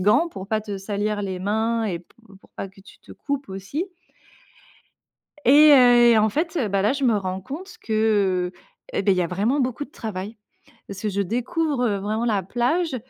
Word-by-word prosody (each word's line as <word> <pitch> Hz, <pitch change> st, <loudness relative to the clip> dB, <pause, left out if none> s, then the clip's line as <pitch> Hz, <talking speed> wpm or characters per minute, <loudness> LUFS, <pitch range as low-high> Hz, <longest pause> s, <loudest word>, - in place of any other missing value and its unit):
gants, 210 Hz, -, +3 dB
pour 195 Hz, -, -8 dB
pas 220 Hz, 0 st, 0 dB
te 205 Hz, -2 st, -5 dB
salir 205 Hz, +1 st, -2 dB
les 190 Hz, -2 st, -4 dB
mains 220 Hz, +4 st, 0 dB
et 185 Hz, -6 st, -2 dB
p 175 Hz, -, -20 dB, 0.3 s
pour -, -, -23 dB
pas 195 Hz, -, -5 dB
que 195 Hz, +1 st, -19 dB
tu 195 Hz, -, -17 dB
te -, -, -14 dB
coupes 280 Hz, -1 st, -4 dB
aussi. 195 Hz, -, -4 dB, 1.6 s
Et, 300 Hz, +3 st, +8 dB
heu, 245 Hz, -2 st, +7 dB
et 225 Hz, -, +5 dB
en 215 Hz, 0 st, +3 dB
fait, 325 Hz, -, -2 dB
heu, 240 Hz, -, 0 dB
bah, 195 Hz, -1 st, 0 dB
là 210 Hz, +5 st, +2 dB
je 280 Hz, 0 st, -3 dB
me 235 Hz, -4 st, +3 dB
rends 190 Hz, -1 st, -4 dB
compte 315 Hz, -, -8 dB
que, 205 Hz, -5 st, +1 dB, 0.4 s
et -, -, 0 dB
beh, 195 Hz, -, +3 dB
il 185 Hz, -, +2 dB
y -, -, +2 dB
a 170 Hz, -, 0 dB
vraiment 210 Hz, -, 0 dB
beaucoup 255 Hz, +2 st, -1 dB
de -, -, -25 dB
travail. 215 Hz, -2 st, -6 dB, 0.5 s
Parce 195 Hz, -1 st, -8 dB
que 215 Hz, -, -1 dB
je 200 Hz, 0 st, -1 dB
découvre, 250 Hz, -, -1 dB
heu, 205 Hz, -4 st, +1 dB
vraiment 215 Hz, +4 st, -2 dB
la 210 Hz, -5 st, +1 dB
plage 260 Hz, -, 0 dB
215 Hz, 210 wpm, -23 LUFS, 195-255 Hz, 1.6 s, Et